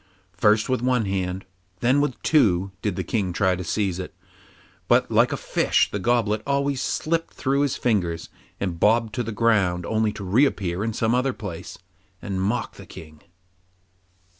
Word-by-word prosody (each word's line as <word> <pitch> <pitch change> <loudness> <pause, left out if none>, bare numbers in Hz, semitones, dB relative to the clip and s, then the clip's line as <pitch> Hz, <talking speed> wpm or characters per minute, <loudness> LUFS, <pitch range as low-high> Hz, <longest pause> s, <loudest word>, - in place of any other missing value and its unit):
First 105 +1 +3
with 130 -2 0
one 125 -3 +1
hand, 95 -1 -2
and - - -33 0.4
then 130 +4 +3
with 130 -5 -2
two, 100 - +3
did 105 -4 -1
the - - -2
King 100 -6 -1
try 95 0 +2
to 90 - -5
seize 95 0 -1
it, 90 - -7 0.7
but - - +3
like - - +4
a - - -1
fish - - +1
the 100 - -2
goblet 110 -1 +1
always 140 -1 0
slipped 165 +1 -2
through 140 +1 0
his 145 -2 +1
fingers 90 -8 -1 0.3
and 90 -4 -3
bobbed 110 +2 +3
to 130 - -1
the 115 -1 -4
ground 100 -6 +1
only 110 -1 +1
to 100 - -7
reappear 95 -4 +1
at 110 -1 -2
some 115 0 +1
other 130 +1 +1
place, 95 -8 -7 0.4
and 95 -1 -4
mock 110 +6 -2
the - - -12
King. 80 -1 -12
105 Hz, 175 wpm, -24 LUFS, 95-125 Hz, 0.7 s, like